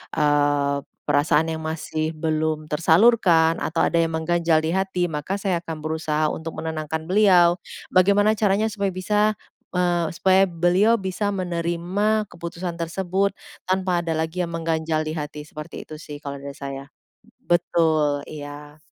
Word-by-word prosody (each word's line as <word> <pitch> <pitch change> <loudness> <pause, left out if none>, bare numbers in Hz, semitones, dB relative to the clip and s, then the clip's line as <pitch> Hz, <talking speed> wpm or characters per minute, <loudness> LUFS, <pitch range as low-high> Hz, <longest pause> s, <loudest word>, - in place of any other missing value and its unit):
eee, 145 -1 +2 0.3
perasaan 155 +2 +2
yang 160 - -5
masih 160 0 -3
belum 155 -1 -1
tersalurkan, 165 0 +4
atau 165 +1 +1
ada 170 - +2
yang 165 - +1
mengganjal 165 0 +2
di 160 +2 0
hati, 190 -2 0
maka 160 +4 -3
saya 190 -4 -1
akan 165 -2 -6
berusaha 155 -1 0
untuk 160 0 -6
menenangkan 160 0 -4
beliau. 180 -2 +4 0.3
Bagaimana 200 +3 +4
caranya 210 0 +1
supaya 200 -2 -1
bisa, 210 +3 +1 0.3
eee, 175 -2 +1
supaya 190 +2 +3
beliau 180 +7 +3
bisa 190 0 -2
menerima 185 +3 -1
keputusan 170 0 -6
tersebut 190 +4 -1 0.3
tanpa 185 -2 +1
ada 165 -2 -2
lagi 160 +3 -2
yang 170 - -2
mengganjal 160 -1 -1
di 155 - -3
hati, 150 -1 -6
seperti 150 0 -9
itu 155 - -11
sih 150 -1 -8
kalau 140 -1 -7
dari 140 +1 -8
saya. 140 -1 -7 0.6
Betul, 160 -4 +2
iya. 145 0 -9
165 Hz, 145 wpm, -23 LUFS, 155-185 Hz, 0.6 s, tersalurkan